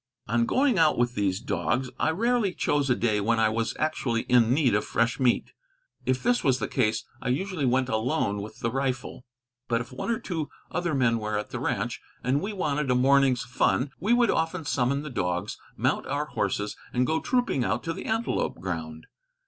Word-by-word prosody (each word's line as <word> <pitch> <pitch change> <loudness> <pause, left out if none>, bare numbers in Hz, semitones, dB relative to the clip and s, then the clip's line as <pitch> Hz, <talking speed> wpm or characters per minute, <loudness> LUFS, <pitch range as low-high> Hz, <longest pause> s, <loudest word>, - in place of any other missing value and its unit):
On 115 +1 +1
going 260 -7 +2
out 155 -2 +4
with 120 0 +1
these 100 -3 0
dogs, 125 +3 -1
I - - +2
rarely 220 +2 +1
chose 145 -2 +1
a 125 - +4
day 110 -3 +1
when 115 +2 +1
I 110 -1 +4
was 115 +1 -1
actually 135 -7 0
in 120 -2 +4
need 130 -3 +3
of 105 - +2
fresh 115 +4 0
meat. 125 -3 +2 0.6
If 130 0 +1
this 245 +1 +2
was 130 -2 +3
the 110 - -2
case, 110 0 0 0.2
I - - -2
usually 155 +1 -1
went 130 +1 +2
alone 110 -3 0
with 105 - -9
the 115 - 0
rifle; 130 -1 -3 0.4
but 115 -1 +1
if 120 - -7
one 130 - -5
or 230 - +1
two 170 -9 -4 0.2
other 175 -4 -1
men 115 -3 +2
were 105 -1 -2
at 105 - -5
the - - -4
ranch, - - -2 0.2
and 130 +4 +1
we 200 - -3
wanted 150 -7 -1
a 125 - +3
morning's 135 -1 +4
fun, 130 +2 +1
we 205 +7 0
would 240 -2 +4
often 165 0 -1
summon 140 +1 0
the 150 - -6
dogs, 90 -3 -2 0.2
mount - - 0
our 145 +2 -1
horses, 105 -5 -2 0.2
and 125 +1 +1
go 160 +4 +1
trooping 245 - 0
out 120 - -1
to 165 - -2
the - - -7
antelope 225 +1 -1
ground. 80 -3 -5
130 Hz, 205 wpm, -27 LUFS, 115-155 Hz, 0.6 s, out